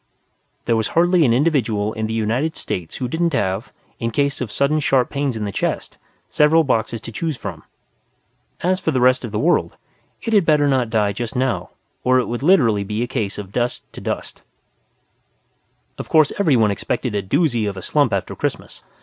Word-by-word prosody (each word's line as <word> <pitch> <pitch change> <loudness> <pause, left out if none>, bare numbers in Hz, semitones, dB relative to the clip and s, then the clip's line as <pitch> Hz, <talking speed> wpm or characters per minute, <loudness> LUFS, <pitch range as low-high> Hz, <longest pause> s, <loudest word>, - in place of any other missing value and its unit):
There 115 - +2
was 110 -1 0
hardly 175 -1 +4
an 120 - +3
individual 115 -7 +1
in 110 -1 -2
the 110 - -4
United 120 +9 0
States 85 -3 -5
who 125 - -3
didn't 165 +5 0
have, 95 -7 -1 0.3
in 115 - -1
case 140 +3 0
of 120 -5 -3
sudden 140 +5 +1
sharp 135 -4 +2
pains 140 -4 -1
in 105 - -3
the 100 - -3
chest, - - -3 0.3
several 155 +2 +4
boxes 115 -4 0
to 115 - -8
choose 155 +4 -3
from. 90 -9 -7 1.0
As 185 +1 +1
for - - -1
the 135 -5 +1
rest 130 +1 +3
of 120 - -5
the 105 - -2
world, 170 +10 +1 0.5
it 225 - -2
had 205 -3 +5
better 150 -2 +3
not 130 -4 +1
die 105 -3 +1
just 120 +4 -5
now 130 0 -1 0.3
or 130 0 +4
it 125 - +2
would 120 0 -3
be 145 - -1
literally 110 - +3
a - - 0
case 115 -6 -3
of 100 -2 -7
dust 120 +2 -2
to - - -9
dust. - - -5 1.6
Of - - -6
course 155 -2 +4
everyone 125 - +3
expected 115 +3 -2
a 100 - 0
doozy 115 - +1
of 100 - -7
a 95 - -7
slump - - +2
after - - -2
Christmas. - - -4
125 Hz, 195 wpm, -20 LUFS, 110-150 Hz, 1.6 s, had